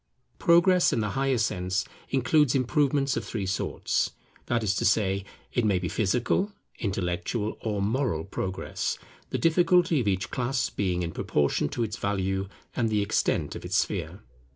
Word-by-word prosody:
Progress 175 +1 +5
in - - +1
the 105 -2 -1
higher 135 +2 +1
sense 95 -3 0 0.2
includes 135 +1 +3
improvements 135 +1 +2
of - - -2
three 105 -4 -3
sorts; 95 0 -1 0.3
that 120 -1 +1
is 100 -2 +2
to - - 0
say, 100 -2 +2 0.3
it 120 - +1
may 100 -3 +3
be 90 -1 -2
Physical, 120 - +1 0.3
Intellectual, 100 +2 -2
or 105 -3 -1
Moral 110 - 0
progress; 95 0 -3 0.3
the - - -1
difficulty 175 0 +4
of 110 - -3
each 95 -2 0
class 125 0 -1
being 90 -3 -1
in 85 - -3
proportion 75 -1 0
to 120 - -2
its 105 -3 -3
value 95 -1 -1 0.3
and 115 -3 +1
the 105 -1 +1
extent 110 +2 0
of - - -7
its - - -2
sphere. - - -1
110 Hz, 160 wpm, -27 LUFS, 95-135 Hz, 0.3 s, Progress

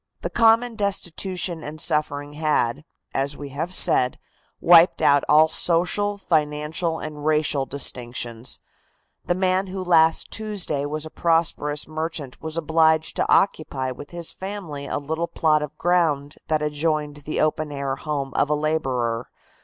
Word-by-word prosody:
The - - -4
common 230 +1 +4
destitution 185 -4 -2
and 155 +1 -7
suffering 145 -1 -1
had, 150 -4 0 0.3
as 140 +1 -1
we 145 -1 -7
have 155 +6 -4
said, 125 -8 +3 0.4
wiped 170 +1 +6
out 140 -1 +4
all 155 +1 +6
social, 180 +6 +1
financial 160 -1 -1
and 150 -2 -7
racial 150 -3 +1
distinctions. 120 -3 -2 0.7
The 175 - +1
man 185 +1 +1
who 190 0 -5
last 165 -2 +3
Tuesday 195 -10 -2
was 155 +1 -3
a 155 - -9
prosperous 165 -3 0
merchant 155 -3 -5
was 160 0 -5
obliged 160 0 +2
to - - 0
occupy 140 -8 +1
with 145 +3 -9
his 170 -1 -5
family 185 -8 -6
a - - -2
little 160 +4 -3
plot 155 -3 +2
of 150 0 -6
ground 160 -5 +1
that 155 -1 0
adjoined 150 0 -1
the 150 +1 -4
open 155 0 0
air 140 -1 -3
home 140 -3 -4
of 145 - +2
a 150 - +2
laborer. 130 -7 -1
155 Hz, 145 wpm, -23 LUFS, 145-170 Hz, 0.7 s, wiped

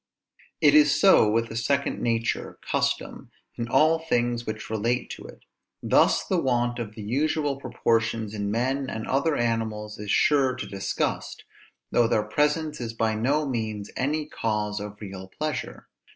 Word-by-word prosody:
It 145 -1 +6
is 150 -1 +5
so 190 - +6
with 115 +2 +1
the - - -7
second 140 +5 0
nature, 115 -1 -1
custom, - - -2 0.3
in 115 - -3
all 155 +6 +4
things 120 -6 -1
which 110 0 -5
relate 115 +3 -1
to - - -8
it. - - -13 0.4
Thus - - +3
the 185 -3 0
want 120 -2 0
of 110 -2 -5
the 110 - -7
usual 145 +4 0
proportions 115 -4 -1
in 100 -1 -2
men 130 +5 -1
and 110 0 -4
other 145 +3 +1
animals 110 -3 -2
is 105 -1 -6
sure 135 +2 +3
to 130 - -5
disgust, 95 -1 -3 0.5
though 120 -1 +4
their 110 - +1
presence 150 +6 0
is 115 -1 -4
by 115 -1 0
no 135 +8 +1
means 110 -5 -3
any 150 +3 -1
cause 105 -5 -2
of 105 0 -8
real 95 -2 -8
pleasure. 140 +5 -5
120 Hz, 160 wpm, -26 LUFS, 110-140 Hz, 0.5 s, It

